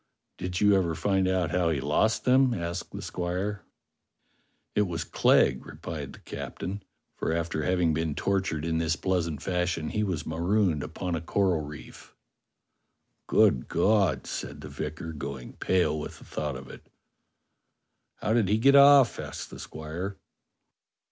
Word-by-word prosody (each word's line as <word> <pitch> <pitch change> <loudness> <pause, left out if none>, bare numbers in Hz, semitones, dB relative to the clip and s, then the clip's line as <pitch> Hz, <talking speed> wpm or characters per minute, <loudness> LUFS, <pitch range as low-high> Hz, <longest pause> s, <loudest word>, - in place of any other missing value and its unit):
"Did 90 0 -3
you 105 -1 +5
ever 85 -4 +1
find 95 +3 +1
out 90 -3 +1
how 90 -1 +2
he 80 -4 0
lost 75 +11 +1
them?" 130 -1 +4
asked 85 0 -4
the - - -7
squire. 90 +3 -3 1.1
"It 105 -1 +2
was 85 -1 -3
Clegg," 65 -3 +3
replied - - -7
the - - -13
captain; 100 +3 -6 0.3
"for - - -2
after 85 -1 -1
having 90 -2 +2
been 80 -1 -1
tortured 95 -5 -1
in 80 -1 0
this 80 0 +1
pleasant 85 -5 -1
fashion 90 -3 -1
he 105 - -1
was 90 -6 -2
marooned 85 0 +1
upon 90 +3 -4
a 80 - -1
coral 90 -1 +1
reef." 75 +1 -11 1.1
"Good 65 - +3
God!" 105 -3 +2
said - - -6
the - - -8
vicar, 80 +2 -5
going 70 -4 -6
pale 80 -5 +1
with - - -7
the - - -15
thought 75 -2 -3
of 65 0 -8
it. - - -13 1.3
"How 110 - -1
did 115 -4 +3
he 105 - +3
get 135 +5 +5
off?" 140 -3 +7
asked - - -6
the - - -9
squire. 85 +6 -6
90 Hz, 155 wpm, -28 LUFS, 80-100 Hz, 1.3 s, off